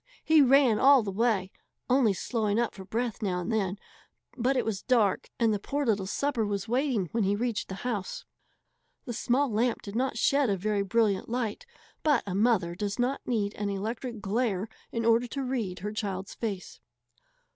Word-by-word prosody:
He 315 -1 +5
ran 270 -4 +5
all 275 -2 +6
the 200 - -3
way, 200 -3 +1 0.4
only 250 -4 +4
slowing 215 +2 -1
up 235 - 0
for 190 - -9
breath 230 +4 -3
now 185 -4 -1
and 175 - -3
then, 200 -3 0 0.6
but 260 +2 +1
it - - +1
was 215 -4 -2
dark, 230 -7 +2
and 225 -2 +3
the 205 - -1
poor 285 +7 -2
little 205 -5 +1
supper 280 +1 0
was 205 0 -2
waiting 245 - 0
when 230 -2 +1
he 200 +1 +2
reached 230 0 -2
the 190 - -4
house. 210 -6 -3 0.8
The 240 - -4
small 255 +4 +1
lamp 230 +2 0
did 200 0 -7
not 255 -1 0
shed 275 +2 +3
a 195 - +1
very 205 +2 0
brilliant 205 -1 +1
light, 240 - -3 0.3
but 295 -5 +3
a 195 - -4
mother 200 -4 +2
does 200 +2 -3
not 255 +3 0
need 210 -4 0
an 205 -1 -3
electric 225 +3 -4
glare 205 -1 0 0.2
in 230 -1 -2
order 230 +1 +4
to 275 +3 -4
read 235 -8 -2
her 210 +2 -3
child's 195 -2 -4
face. 205 -5 -5
225 Hz, 190 wpm, -28 LUFS, 200-245 Hz, 0.8 s, all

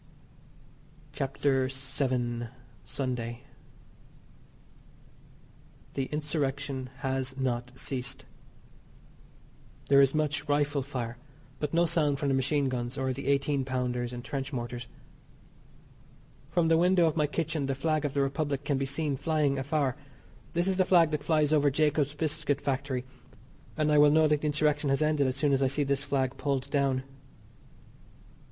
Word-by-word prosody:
CHAPTER 135 -1 0
VII. 130 -3 -2 0.4
SUNDAY. 125 -2 -3 2.5
The 135 - -1
Insurrection 145 -3 -2
has 135 0 -2
not 125 -2 -1
ceased. 135 0 -4 1.6
There 140 0 +7
is 135 +1 +3
much 150 -1 -1
rifle 145 0 +2
fire, 125 -3 -5 0.4
but 150 -1 -2
no 170 +1 +4
sound 155 -4 +2
from 145 -1 -1
the - - +2
machine 140 +2 +1
guns 125 0 -3
or 130 -1 0
the - - -6
eighteen 140 0 +2
pounders 125 -2 -2
and 120 0 -7
trench 135 0 -4
mortars. 120 -2 -5 1.6
From 165 +1 +2
the 165 0 +4
window 180 0 +4
of 160 - +1
my 150 -2 +2
kitchen 155 -1 -2
the 135 - -1
flag 155 +2 0
of 145 -1 -2
the 140 - +3
Republic 140 0 -1
can 140 -2 0
be 135 - -1
seen 145 +1 -1
flying 145 -1 +1
afar. 140 -2 0 0.6
This 175 +1 +1
is 190 -1 +1
the 190 - +5
flag 170 -4 +5
that 150 -1 -2
flies 155 -1 +2
over 145 -1 +4
Jacob's 150 0 +1
Biscuit 150 -2 -1
Factory, 135 -2 -2 0.7
and 155 0 +2
I 150 - +5
will 145 0 +7
know 155 +1 +5
that 150 -1 +2
the 155 - 0
Insurrection 150 -1 +1
has 135 +3 +2
ended 150 -3 +2
as 130 - -1
soon 140 0 +2
as 135 - +2
I 135 - +4
see 140 +3 0
this 140 0 0
flag 135 -2 -1
pulled 140 -3 -2
down. 135 -2 +1
140 Hz, 150 wpm, -29 LUFS, 130-150 Hz, 2.5 s, There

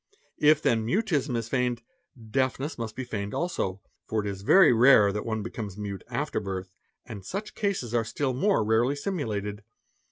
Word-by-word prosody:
If 150 +1 +5
then 115 -1 +2
mutism 145 - 0
is 115 -1 -3
feigned, 125 -1 -1 0.5
deafness 135 +3 0
must 115 -2 -5
be 130 - -4
feigned 105 -4 -4
also, 100 - -2 0.3
for 110 -1 0
it 105 - -5
is 100 -1 -5
very 165 - +6
rare 115 -4 +6
that 105 +2 -4
one 110 -2 -2
becomes 105 -3 -6
mute 100 -2 -5
after - - -2
birth, 95 -1 -5 0.3
and 105 -5 -8
such 200 - -5
cases 195 - -2
are 120 -1 +2
still 130 +4 -2
more 145 - +2
rarely 115 +5 +2
simulated. 110 - -3
115 Hz, 170 wpm, -27 LUFS, 105-140 Hz, 0.5 s, very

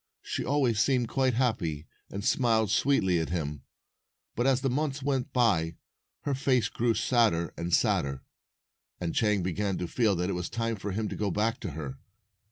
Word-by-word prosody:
She - - -3
always 130 -6 +1
seemed 125 -1 +2
quite 130 -3 +1
happy, 90 - 0 0.2
and 100 +1 -5
smiled 110 -5 +2
sweetly 95 -11 +3
at 80 - -2
him. 75 -5 -3 0.7
But 120 +3 +1
as 130 -1 +3
the 135 - +1
months 140 0 -1
went 135 -1 -1
by, 90 -11 +2 0.5
her 145 - -1
face 130 -2 +2
grew 115 -1 +1
sadder 110 -9 +2
and 85 +1 -4
sadder, 70 -4 +1 0.8
and 85 -2 -2
Chang 105 -4 +2
began 95 +2 -1
to 90 - -3
feel 110 -2 +2
that 90 +1 -1
it 100 - -1
was 90 0 -3
time 115 -1 -1
for 100 +1 -4
him 105 +3 -1
to - - -5
go 105 - -1
back 110 +4 0
to 95 - -5
her. 70 -3 -6
110 Hz, 180 wpm, -29 LUFS, 90-125 Hz, 0.8 s, sweetly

